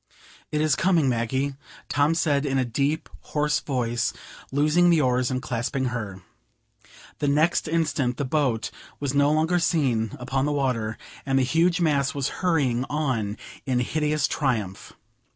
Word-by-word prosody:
"It 150 - 0
is 155 -3 +3
coming, 170 -3 +3
Maggie!" 130 +3 0 0.3
Tom 145 +3 +2
said, 145 -4 +1
in 135 -2 0
a 130 - +2
deep, 140 +6 -1
hoarse 150 0 0
voice, 120 -2 -1 0.4
loosing 155 +5 +3
the 170 -2 +4
oars, 125 -3 +2
and 130 -1 -2
clasping 125 +2 -2
her. 100 -5 -5 1.0
The 145 - 0
next 155 +5 +2
instant 150 -6 0
the 140 - -1
boat 130 -5 0 0.3
was 140 -2 -2
no 145 +1 +4
longer 160 +3 +2
seen 130 - +1
upon 130 +2 -1
the 150 - 0
water, 125 -6 -1 0.3
and 135 -1 +1
the 135 - +4
huge 170 +6 +2
mass 140 -5 +1
was 140 -2 -1
hurrying 140 -9 +2
on 125 -9 -1 0.3
in 125 -2 +1
hideous 150 +3 0
triumph. 110 - -2
140 Hz, 150 wpm, -25 LUFS, 125-155 Hz, 1.0 s, the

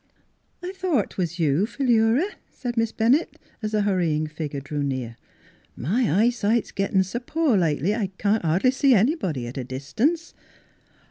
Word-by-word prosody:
" - - -39
I - - -3
thought 345 - 0
'twas 175 -2 -3
you, 160 +4 +2
Philura," 235 +3 +2 0.2
said 245 -2 -5
Miss 230 -1 +1
Bennett 250 +9 +1 0.2
as 215 -1 -3
the 210 -1 +2
hurrying 170 -6 +1
figure 150 -2 -5
drew 145 +1 -4
near. 130 -4 -3 0.4
" - - -32 0.2
My 210 - 0
eyesight's 235 -1 +1
gettin' 195 -1 +1
s' 190 +4 -4
poor 320 -7 +2
lately 165 +1 +1
I 215 -3 -1
can't 205 0 +1
hardly 175 +10 +3
see 265 -1 +4
anybody 190 - +1
at 120 +3 -6
a - - -3
dis 130 +2 -8
tance." 325 +8 0
205 Hz, 165 wpm, -24 LUFS, 155-240 Hz, 0.4 s, see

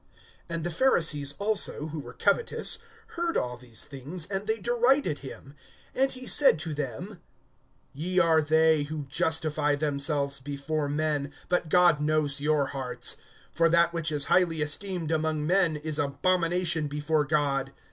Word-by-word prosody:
(14)And 165 -1 -3
the 175 - -2
Pharisees 155 - +2
also; 200 -7 0
who 155 0 -5
were - - -9
covetous, 455 -1 0 0.3
heard 340 -1 -2
all 125 0 -2
these 120 -2 -7
things; 150 +5 -5
and 195 +2 -4
they 220 - +1
derided 240 - +1
him. 135 0 -10 0.4
(15)And 270 +1 +2
he 255 0 -9
said 280 - +5
to 160 0 -5
them: 150 - -5 0.7
Ye 175 +6 -3
are 165 -3 +5
they 160 0 +3
who 150 +1 -4
justify 155 0 0
themselves 140 -1 -1
before 145 +2 -3
men; 145 -1 -1 0.2
but 175 -2 0
God 175 -2 +5
knows 150 -2 0
your 150 -1 +2
hearts; 130 -3 -1 0.4
for 165 0 +3
that 170 0 +3
which 165 -2 -1
is 145 -2 0
highly 165 -4 +2
esteemed 170 +2 -2
among 155 -1 0
men 175 -2 +2
is 155 0 -4
abomination 170 +2 +1
before 150 +1 0
God. 140 -2 0
155 Hz, 150 wpm, -27 LUFS, 145-175 Hz, 0.7 s, said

